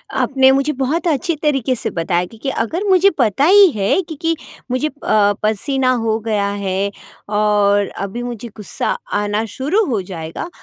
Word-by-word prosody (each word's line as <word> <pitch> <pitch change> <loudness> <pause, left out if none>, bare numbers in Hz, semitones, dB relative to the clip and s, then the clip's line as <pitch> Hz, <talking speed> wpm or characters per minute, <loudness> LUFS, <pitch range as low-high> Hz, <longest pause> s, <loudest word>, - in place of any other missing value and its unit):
आपने 265 -1 +3
मुझे 275 +2 +1
बहुत 280 +6 -1
अच्छी 335 +2 0
तरीके 270 -4 0
से - - 0
बताया 175 +1 0
क्योंकि 225 +7 -6
अगर 270 - -2
मुझे 380 +1 +5
पता 245 +1 +2
ही 395 +2 +7
है 210 - +1
क्योंकि 325 -1 -2 0.4
मुझे 255 +4 0
अ, 215 -8 +1
पसीना 255 +5 +1
हो 220 -1 +1
गया 205 -2 +1
है। 200 0 -2 0.4
और 205 -1 +2 0.2
अभी 200 +5 -5
मुझे 240 -1 -6
गुस्सा 210 - -4 0.2
आना 205 +1 0
शुरू 310 +12 +1
हो 225 -8 -1
जाएगा 175 - -6
240 Hz, 160 wpm, -18 LUFS, 205-290 Hz, 0.4 s, ही